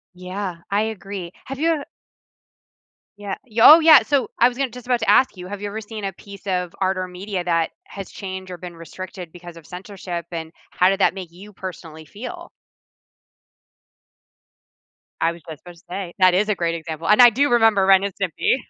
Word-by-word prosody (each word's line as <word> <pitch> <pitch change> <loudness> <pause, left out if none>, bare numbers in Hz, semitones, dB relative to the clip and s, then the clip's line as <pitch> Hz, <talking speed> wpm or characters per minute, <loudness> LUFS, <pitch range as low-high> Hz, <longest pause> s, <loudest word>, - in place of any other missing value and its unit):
Yeah, 185 0 -5
I 205 +2 +1
agree. 195 -5 -6
Have 270 +1 -7
you 330 +1 +2
ev 300 -3 -1 1.3
Yeah. 200 -2 -5
Y 225 -2 -15
Oh, 310 +7 +10
yeah, 315 -2 +8
so, 280 -3 0
I 245 - +6
was 245 - -11
gonna 270 -2 -1
just 250 -1 -11
about 245 -2 +2
to 220 - 0
ask 255 -6 +4
you, 180 0 -8
have 205 +1 -7
you 205 - -3
ever 220 +2 -5
seen 215 -1 -8
a 195 - -3
piece 200 +1 -13
of 180 -2 -1
art 190 0 +1
or 185 0 -3
media 185 +1 -5
that 165 -2 0
has 195 -2 -9
changed 190 -1 -7
or 180 - -7
been 175 0 -9
restricted 180 +1 -9
because 175 -1 -11
of 165 -2 -14
censorship, 180 -2 -7
and 160 -1 -5 0.2
how 180 - +3
did 195 +1 0
that - - +3
make 185 -4 -8
you 200 +4 -14
personally 165 -4 -9
feel? 300 - -9 2.7
I 165 - +3
was 170 -1 -11
just 155 - -9
about 175 -1 -13
to 170 - -20
say, 180 -1 -5
that 185 -1 +6
is 205 +4 +2
a 210 - +2
great 170 -1 -1
example, 165 0 -6
and 210 +6 +6
I 245 - +10
do 280 +6 +1
remember 225 -5 +4
Ren& 190 0 +6 0.2
Stimpy. 185 +4 +1
190 Hz, 200 wpm, -22 LUFS, 175-215 Hz, 2.7 s, Oh